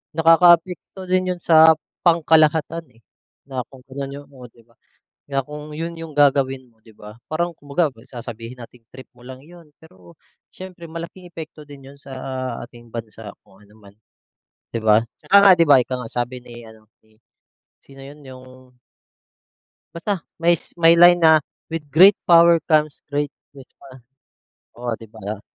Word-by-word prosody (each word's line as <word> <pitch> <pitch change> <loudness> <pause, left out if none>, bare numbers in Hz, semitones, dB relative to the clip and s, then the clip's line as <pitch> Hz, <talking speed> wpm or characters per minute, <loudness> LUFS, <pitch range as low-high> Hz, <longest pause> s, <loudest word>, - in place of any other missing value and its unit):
nakakaapekto 170 +3 +3
din 185 0 0
yun 175 - -18
sa 160 -1 +6 0.3
pangkalahatan 160 -1 +2
eh, 115 - -25 0.5
na 130 - -4
kung 135 -2 -17
ganun 140 0 -6
yung - - -23
o 130 -2 -13
'di 115 0 -23
ba. 115 +1 -31 0.5
Kaya 135 -1 -2
kung 150 0 -9
yun 165 +1 -5
yung 165 -1 -9
gagawin 135 -2 +2
mo,'di 110 0 -21
ba? 105 0 -14 0.2
Parang 170 +2 -2
kumbaga, 145 +4 -1 0.2
sasabihin 120 0 -9
nating, 120 0 -14
trip 130 0 -12
mo 125 - -20
lang 130 +1 -11
yun, 170 -2 -17
pero 90 - -19 0.3
siyempre 185 -2 -12
malaking 170 +2 -9
epekto 160 -2 -10
din 140 -2 -13
yun 140 - -20
sa, 140 - -13
ah, 130 -1 -5
ating 120 -1 -18
bansa 115 -2 -9 0.2
kung 100 0 -23
ano 105 - -23
man, 100 -2 -18 0.8
'di 115 - -3
ba. 110 +1 +3 0.2
Tsaka 200 - +3
nga 200 -1 +7
di 170 - +2
ba 145 -4 +6
ika 130 +1 -2
nga, 115 - -9
sabi 125 +1 -4
ni 120 -1 -13
ano 110 -1 -18 0.2
ni 110 - -29 0.7
sino 135 0 -17
yun? 145 +2 -13
Yung 130 -1 -15 1.2
Basta 180 +2 -3 0.2
may 170 +1 +4
s - - -14
line 170 +1 +6
na, 160 -2 +5 0.3
"With 160 -3 -6
great 185 +8 +7 0.2
power 170 0 +6
comes 155 -1 +1
great 145 0 -2 0.3
response" 130 -2 -16 0.7
Oh, 120 0 -4
'di 115 -1 -14
ba? 105 -1 -8
140 Hz, 165 wpm, -20 LUFS, 120-165 Hz, 1.2 s, nga